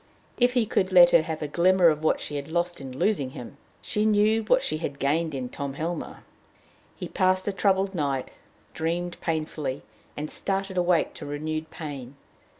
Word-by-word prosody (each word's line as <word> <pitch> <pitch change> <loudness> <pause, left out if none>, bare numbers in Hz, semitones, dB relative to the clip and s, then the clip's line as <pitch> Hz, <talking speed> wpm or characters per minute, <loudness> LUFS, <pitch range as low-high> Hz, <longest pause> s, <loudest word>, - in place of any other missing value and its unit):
If 245 0 +4
he 245 -3 +2
could 195 -3 +1
but 185 - -9
let 175 -1 +9
her 170 - +6
have 160 -1 -4
a - - -2
glimmer 175 +3 +4
of 155 0 -1
what 160 - +2
she 145 - -5
had 140 0 -4
lost 175 0 -1
in 130 -1 -8
losing 145 -8 +1
him! 125 +3 -9 0.3
She 210 - 0
knew 215 +1 +3
what 255 +4 +3
she 155 - 0
had 145 -4 -4
gained 155 +3 0
in 130 -2 -3
Tom 140 +2 -5
Helmer. 170 +4 -4 0.7
He - - -6
passed 185 0 +1
a - - +2
troubled 195 0 +1
night, 140 -6 -2 0.4
dreamed 175 +2 -3
painfully, 155 -4 -3 0.3
and 150 +1 -4
started 195 -1 -2
awake 175 -2 +2
to - - -8
renewed 155 +2 -4
pain. 140 -5 -7
165 Hz, 185 wpm, -26 LUFS, 145-190 Hz, 0.7 s, let